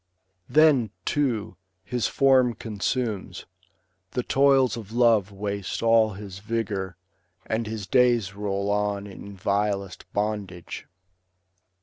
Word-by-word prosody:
Then, 150 -7 +5 0.2
too, 130 -8 -1 0.3
his 120 +4 -1
form 130 -3 +4
consumes, 105 -3 -3 0.7
the 125 - -1
toils 135 -2 +4
of 110 -3 -8
love 115 -4 +3
Waste 100 0 -4
all 115 -2 +4
his 95 -1 -8
vigour, 100 -4 -3 0.5
and 110 0 -2
his 110 -2 -4
days 120 -5 +3
roll 100 0 -2
on 105 -1 0
In 100 0 -10
vilest 100 0 -1
bondage. 100 -4 -3
105 Hz, 105 wpm, -25 LUFS, 100-120 Hz, 0.7 s, Then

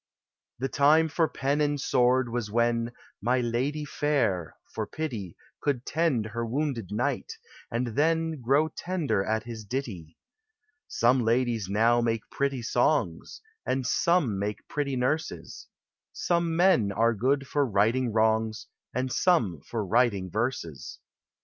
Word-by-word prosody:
The 135 - -1
time 155 +4 +4
for 160 +2 +2
Pen 140 +1 -1
and 145 -1 +1
Sword 125 0 +2
was 115 -2 -3
when 115 +1 +1 0.2
« - - -33
My 125 +5 +2
ladye 130 +6 -1
fayre 125 - 0
" - - -31
for 110 -1 -3
pity 115 - -5 0.2
Could 130 -4 -1
tend 155 -9 +1
her 115 +2 -4
wounded 125 -3 -2
knight, 105 - -2 0.3
and 120 +2 -1
then 160 +3 0
Grow 140 +6 +3
tender 155 - -1
at 110 +2 -1
his 115 -2 -7
ditty! 100 - -5 0.7
Some 120 +2 +2
ladies 115 -3 +1
now 115 +4 +3
make 115 -2 -1
pretty 140 -3 -1
son 120 - +1 0.4
And 130 0 -1
some 140 - +2
make 105 +1 -4
pretty 140 -2 -2
nurses; 145 +6 -3 0.4
Some 170 -1 0
men 170 - +4
are 115 +3 +2
good 135 +6 +1
for 145 +2 +1
righting 115 +2 +1
wrongs 110 0 +1 0.3
And 130 0 -1
some 115 - +2
for 110 -3 -3
writing 100 -3 +1
verses. 110 - -3
120 Hz, 140 wpm, -27 LUFS, 110-145 Hz, 0.7 s, time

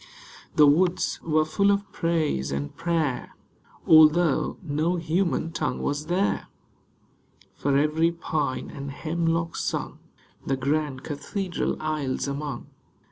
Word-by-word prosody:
The 150 - +7
woods 175 +5 +2
were 155 -1 +2
full 200 +6 +2
of 200 0 0
praise 160 - 0
and 70 +1 -4
prayer, 160 -7 -1 0.5
Although 155 0 +5
no 160 +2 0
human 170 0 0
tongue 155 -2 -2
was 145 +2 -2
there; 185 +4 0 1.1
For 140 -1 +1
every 155 +3 +2
pine 155 -5 -3
and 140 -1 -6
hemlock 165 +3 -1
sung - - -3 0.4
The 135 - -1
grand 140 0 -1
cathedral 180 +5 -3
aisles 150 -4 -2
among. 140 +1 -4
155 Hz, 115 wpm, -25 LUFS, 145-170 Hz, 1.1 s, The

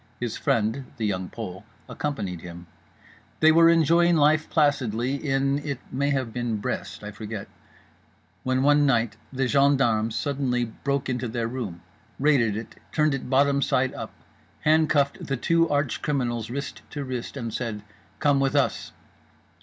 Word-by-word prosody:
His 120 -3 -3
friend 115 +4 0
(The 110 - -2
Young 95 -3 -2
Pole) 100 -4 -7 0.2
accompanied 100 - -4
him. 85 0 -9 0.7
They 160 0 +6
were 165 +1 +6
enjoying 170 +1 +4
life 155 +1 +3
placidly 130 -5 +1
in, 140 -1 0
it 145 -2 -4
may 140 +2 0
have 130 -5 -1
been, 120 -3 -1
Brest—I 105 0 -4
forget—when 110 +1 -7
one 145 0 +5
night 115 -4 +1
the 135 -1 0
gendarmes 125 -5 +3
suddenly 130 -4 0
broke 140 +4 -3
into 125 -1 -2
their 115 0 -2
room, 110 -9 -5 0.3
raided 130 -8 +3
it, 110 - -8
turned 150 -2 +2
it 135 -2 -4
bottomside 140 -1 +2
up, - - -6 0.5
handcuffed 155 -2 +2
the 135 - -2
two 165 +5 +2
arch 145 -3 0
criminals 120 -6 -1
wrist 140 +3 -5
to 145 - -5
wrist, 130 0 -5
and 115 -4 -4
said 110 -4 -4 0.4
"Come 145 -2 +3
with 135 -1 +1
us." - - 0
130 Hz, 145 wpm, -25 LUFS, 115-145 Hz, 0.7 s, They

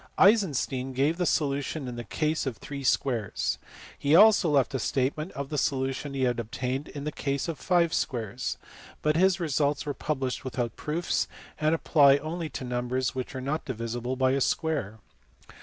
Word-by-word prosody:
Eisenstein 145 - +3
gave 140 +6 +1
the 180 - 0
solu 140 -4 +1
tion 140 0 -4
in 125 - -5
the 120 - -5
case 155 +3 -1
of 120 -5 -3
three 140 -1 -7
squares. 125 -4 0 0.4
He 145 +3 +3
also 205 -2 +7
left 140 -3 +2
a 135 - 0
statement 140 - -1
of 140 0 -5
the 150 - -1
solution 135 +1 -1
he 135 - 0
had 120 -1 +1
obtained 125 +4 -3
in 145 - -7
the 150 - -2
case 140 0 -2
of 165 -5 -4
five 170 -3 +2
squares*; 120 -1 -2 0.5
but 150 0 +2
his 185 +1 +4
results 150 -3 0
were 145 - -2
published 135 -4 -2
without 120 -2 -3
proofs, 165 +3 -1 0.3
and 155 +1 +3
apply 140 -4 +5
only 160 +2 -4
to - - -6
numbers 125 +1 -1
which 130 0 -5
are 130 - -3
not 145 +4 -2
divisible 120 +1 -3
by 130 0 +2
a 135 +1 +1
square. 140 - 0
140 Hz, 180 wpm, -28 LUFS, 130-155 Hz, 0.5 s, also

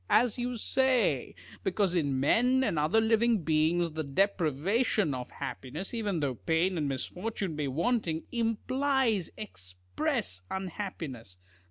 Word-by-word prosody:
As 235 0 +4
you 245 0 -2
say: 245 - +1 0.3
because 190 -1 +1
in 145 -6 +1
men 250 - +3
and 165 -11 +1
other 155 +9 +3
living 225 -2 +3
beings, 160 +2 +2
the 155 +1 -3
deprivation 185 - +1
of 125 -1 -5
happiness, 150 - -6
even 205 -8 -1
though 140 -3 0
pain 160 - 0
and 150 -4 0
misfortune 180 +6 -3
be 150 -1 -1
wanting, 165 - 0
implies 235 - +1
express 90 - -3
unhappiness. 165 - -5
180 Hz, 125 wpm, -30 LUFS, 145-225 Hz, 0.3 s, As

